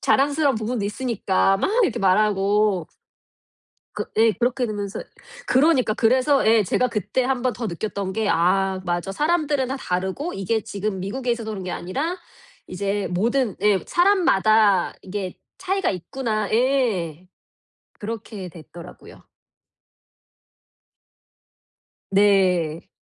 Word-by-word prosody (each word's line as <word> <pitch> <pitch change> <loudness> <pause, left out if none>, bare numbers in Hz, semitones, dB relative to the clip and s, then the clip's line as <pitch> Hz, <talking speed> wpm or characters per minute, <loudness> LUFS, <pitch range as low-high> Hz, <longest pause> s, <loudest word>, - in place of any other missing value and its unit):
자랑스러운 285 +1 +2
부분도 220 0 -2
있으니까 205 -4 0
막 380 - 0
이렇게 245 - -1
말하고 200 -1 +2 1.1
그 - - -3
예 225 0 +5
그렇게 245 +3 0
되면서 205 -2 -4 0.5
그러니까. 260 -5 +3
그래서 255 +4 +3
예 220 0 +5
제가 250 +6 +1
그때 230 +3 -1
한번 255 -1 0
더 235 +1 -5
느꼈던 200 +1 -4
게 220 0 -1
'아 190 +2 +2
맞아 175 +2 -2
사람들은 295 - 0
다 270 - -3
다르고 190 - -3
이게 195 +3 -1
지금 200 -1 -4
미국에 245 +7 -3
있어서 230 -2 -4
그런 195 -3 -5
게 180 - -4
아니라, 280 - -3 0.5
이제 200 +1 -2
모든' 225 +4 0
예 205 -2 +4
'사람마다 220 - +3
이게 190 -1 -5 0.2
차이가 385 +1 0
있구나' 215 +3 -3
예. 220 - 0 0.7
그렇게 210 -3 -6
됐더라고요. 170 +1 -13 2.9
네. 185 -5 +2
215 Hz, 260 characters per minute, -22 LUFS, 190-255 Hz, 2.9 s, 예